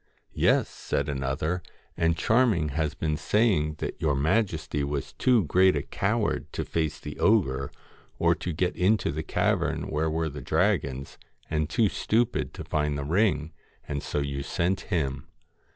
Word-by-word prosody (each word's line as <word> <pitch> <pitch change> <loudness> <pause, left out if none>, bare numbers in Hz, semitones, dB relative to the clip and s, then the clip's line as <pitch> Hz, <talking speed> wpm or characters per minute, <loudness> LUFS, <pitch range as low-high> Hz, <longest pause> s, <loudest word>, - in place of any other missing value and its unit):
* - - -38 0.2
Yes,' - - +3
said 70 - -3
another; 70 +5 -1 0.2
' - - -33
and 80 0 +1
Charming 110 -10 +3
has 75 +1 -1
been 75 -2 -1
say 110 +7 +3
ing 75 -2 -1
that 75 - -5
your 75 -4 +2
majesty 80 -2 0
was 70 -1 -3
too 125 -5 +3
great 90 +3 +4
a 70 - -1
coward - - -1
to - - -2
face 80 -2 -1
the 75 - -8
ogre, 70 -12 +2 0.5
or - - +4
to 90 - -4
get 90 +3 -1
into 100 +3 +2
the 80 +2 -3
cavern 80 - 0
where 80 +1 0
were 80 +1 -1
the 75 0 -7
dragons, 70 0 0 0.3
and 75 -1 0
too 115 -3 +3
stupid 110 +4 0
to - - -6
find 75 -1 -1
the 70 - -3
ring, 80 -1 +1 0.3
and 70 -1 -3
so - - -4
you 70 -1 -1
sent 90 +7 -1
him.' 70 -8 -1
80 Hz, 170 wpm, -27 LUFS, 70-90 Hz, 0.5 s, great